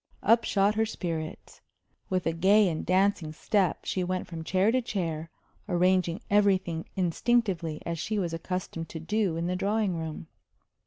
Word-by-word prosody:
Up 230 Hz, +3 st, +4 dB
shot 200 Hz, +1 st, +2 dB
her 220 Hz, +1 st, +1 dB
spirits. 165 Hz, -6 st, -5 dB, 0.5 s
With 185 Hz, -1 st, 0 dB
a 165 Hz, -, +1 dB
gay 195 Hz, +5 st, +4 dB
and 160 Hz, -3 st, -2 dB
dancing 185 Hz, -3 st, +2 dB
step 190 Hz, +2 st, 0 dB
she 185 Hz, -, -1 dB
went 185 Hz, 0 st, -2 dB
from 165 Hz, -2 st, -7 dB
chair 190 Hz, +5 st, +2 dB
to 255 Hz, +1 st, +2 dB
chair, 165 Hz, -8 st, -3 dB, 0.4 s
arranging 180 Hz, -1 st, +2 dB
everything 190 Hz, -5 st, +2 dB
instinctively 185 Hz, -3 st, 0 dB
as 170 Hz, -1 st, -3 dB
she 215 Hz, +6 st, -2 dB
was 175 Hz, -4 st, -1 dB
accustomed 165 Hz, -1 st, -4 dB
to 160 Hz, -, -6 dB
do 190 Hz, 0 st, 0 dB
in 165 Hz, -, -2 dB
the 180 Hz, +1 st, -1 dB
drawing 200 Hz, 0 st, 0 dB
room. 160 Hz, -, -5 dB
185 Hz, 160 wpm, -28 LUFS, 165-200 Hz, 0.5 s, Up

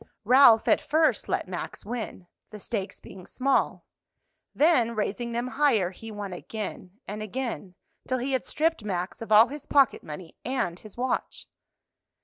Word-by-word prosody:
Ralph 235 Hz, -1 st, +6 dB
at -, -, +4 dB
first 310 Hz, -6 st, +1 dB
let -, -, -1 dB
Max 180 Hz, +1 st, -6 dB
win, 220 Hz, -5 st, -5 dB, 0.2 s
the 210 Hz, -, -10 dB
stakes 200 Hz, -2 st, -4 dB
being 185 Hz, -1 st, -12 dB
small; 270 Hz, +1 st, 0 dB, 0.7 s
then 255 Hz, -7 st, +3 dB
raising 215 Hz, +3 st, -2 dB
them 240 Hz, +2 st, -2 dB
higher, 245 Hz, -11 st, +2 dB
he 225 Hz, +4 st, -10 dB
won 205 Hz, -3 st, -6 dB
again 200 Hz, -1 st, -7 dB
and 210 Hz, +2 st, -5 dB
again, 215 Hz, -4 st, -5 dB, 0.3 s
till 255 Hz, -, 0 dB
he 255 Hz, +2 st, -2 dB
had 260 Hz, -, 0 dB
stripped 320 Hz, -6 st, 0 dB
Max 185 Hz, -1 st, -3 dB
of 225 Hz, -, -7 dB
all 220 Hz, +3 st, +8 dB
his 290 Hz, +1 st, -8 dB
pocket 280 Hz, -2 st, +4 dB
money 160 Hz, +2 st, -9 dB
and 225 Hz, -9 st, -2 dB
his 215 Hz, 0 st, -14 dB
watch. 255 Hz, +1 st, -2 dB
225 Hz, 155 wpm, -27 LUFS, 200-260 Hz, 0.7 s, all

